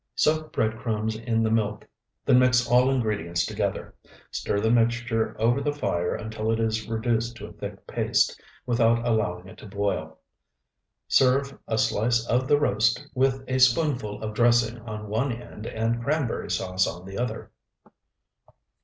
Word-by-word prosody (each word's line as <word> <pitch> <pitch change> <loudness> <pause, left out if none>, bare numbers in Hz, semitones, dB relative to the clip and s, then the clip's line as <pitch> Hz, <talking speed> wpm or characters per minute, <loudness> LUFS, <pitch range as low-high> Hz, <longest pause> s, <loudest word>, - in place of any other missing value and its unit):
Soak 155 0 +1
bread 110 0 -1
crumbs 110 -1 -2
in 115 0 0
the 110 - +1
milk; 105 -2 0 0.4
then 125 -2 +6
mix 125 -1 +4
all 125 +2 +4
ingredients 105 -10 0
together. - - -3 0.4
Stir 100 - -1
the 110 +2 +2
mixture 115 -1 +1
over 120 +5 +2
the 145 +1 0
fire 90 -12 -1
until 110 0 -4
it 115 - 0
is 110 0 -1
reduced 115 +1 -1
to 105 -3 -8
a - - -11
thick - - -8
paste, - - +1 0.2
without 115 -1 +2
allowing 95 -6 0
it - - -13
to - - -11
boil. 100 -6 -2 0.9
Serve 135 +1 +3
a 110 - 0
slice 115 +2 +1
of 125 +2 +1
the 145 +1 +4
roast 120 +1 +1
with 130 0 +1
a 130 0 0
spoonful 125 -5 +2
of 110 -1 -4
dressing 120 0 +3
on 105 -2 -7
one 115 +6 0
end 115 -2 -8
and 115 +1 -1
cranberry 145 -1 -1
sauce 95 0 0
on 90 +2 -7
the 95 +2 -6
other. 120 -2 -4
115 Hz, 160 wpm, -26 LUFS, 110-125 Hz, 0.9 s, then